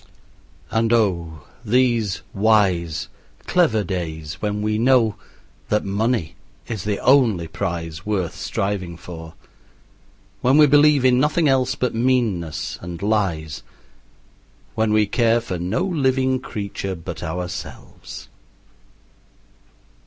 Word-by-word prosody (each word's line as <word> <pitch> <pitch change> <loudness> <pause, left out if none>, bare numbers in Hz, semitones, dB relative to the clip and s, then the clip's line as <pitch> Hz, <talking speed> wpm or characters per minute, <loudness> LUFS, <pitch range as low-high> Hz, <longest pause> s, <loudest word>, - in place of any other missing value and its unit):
And 115 0 +1
oh, 85 -9 0 0.2
these 115 -3 +1
wise, 95 -7 +2 0.4
clever 155 - +2
days 80 -5 -5
when 105 0 -2
we 105 0 0
know 120 -3 +4 0.6
that 105 - +1
money 100 -2 0 0.3
is 110 -6 -5
the 105 -1 0
only 115 -11 +4
prize 85 -1 -4
worth 100 -5 -2
striving 95 -4 -3
for, 80 -2 -10 1.1
when 130 +3 +4
we 155 - +8
believe 145 -1 +5
in 125 -1 +5
nothing 150 +3 +2
else 130 -2 +2
but 125 - -1
meanness 115 -10 0
and 85 -1 -7
lies, 90 -8 -1 1.1
when 110 -1 +1
we 110 0 +4
care 115 +2 +2
for 95 -7 -5
no 90 - -1
living 130 -7 +1
creature 100 -5 -5
but 85 -2 -7
ourselves! 90 +2 -7
105 Hz, 110 wpm, -21 LUFS, 90-125 Hz, 1.1 s, we